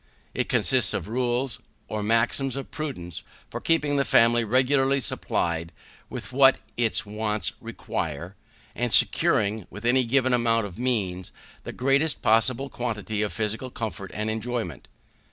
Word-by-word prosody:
It - - -2
consists - - +2
of - - -4
rules, 120 +1 -1 0.3
or 110 - -3
maxims 115 +5 +1
of 135 - -6
prudence, 90 - -6 0.3
for - - -5
keeping 150 -3 +1
the 140 - +3
family 115 -2 +4
regularly 135 +4 +2
supplied 85 -8 -2 0.4
with - - -7
what 135 0 +6 0.2
its 115 -2 +1
wants 105 0 -2
require, 85 +5 -5 0.4
and - - -2
securing, 105 -1 +4
with 105 +5 -9
any 130 +2 +4
given 130 +1 +2
amount 115 -2 +2
of 95 +1 -9
means, 100 -8 -2 0.3
the - - -5
greatest 135 +4 +1
possible 120 +4 +3
quantity 110 -4 -3
of 105 - -1
physical 110 +3 -3
comfort 110 -5 -5
and 105 +2 -2
enjoyment. 110 - -4
115 Hz, 140 wpm, -25 LUFS, 105-130 Hz, 0.4 s, what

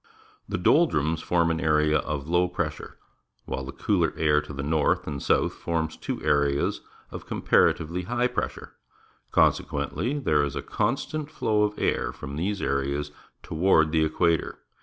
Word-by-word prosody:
The - - -1
doldrums 80 - +2
form 85 -2 +1
an 80 - -1
area 75 0 +3
of 70 -1 -4
low 90 +2 +2
j)ressure, 80 -3 -4 0.5
while 65 0 -4
the 65 - -6
cooler - - 0
air 75 -1 +3
to - - -10
the 70 0 -5
north 75 +1 +1
and 75 -2 -4
the - - -7
south - - +2
forms 80 -2 -2
two - - -4
areas 70 -1 +1 0.3
of - - -8
comparatively 85 +3 +2
high 120 +3 0
pressure. 125 - -3 0.6
Consequenth', 140 +4 +1
there 75 -7 +3
is 70 -2 -3
a - - -4
constant 155 -1 -2
flow 110 -9 0
of 105 0 0
air - - 0
from 70 - -8
these 95 +6 -2
areas 70 +1 -1 0.3
toward 80 -2 +3
the 80 -1 +3
equator. 80 +1 +1
80 Hz, 160 wpm, -26 LUFS, 75-90 Hz, 0.6 s, area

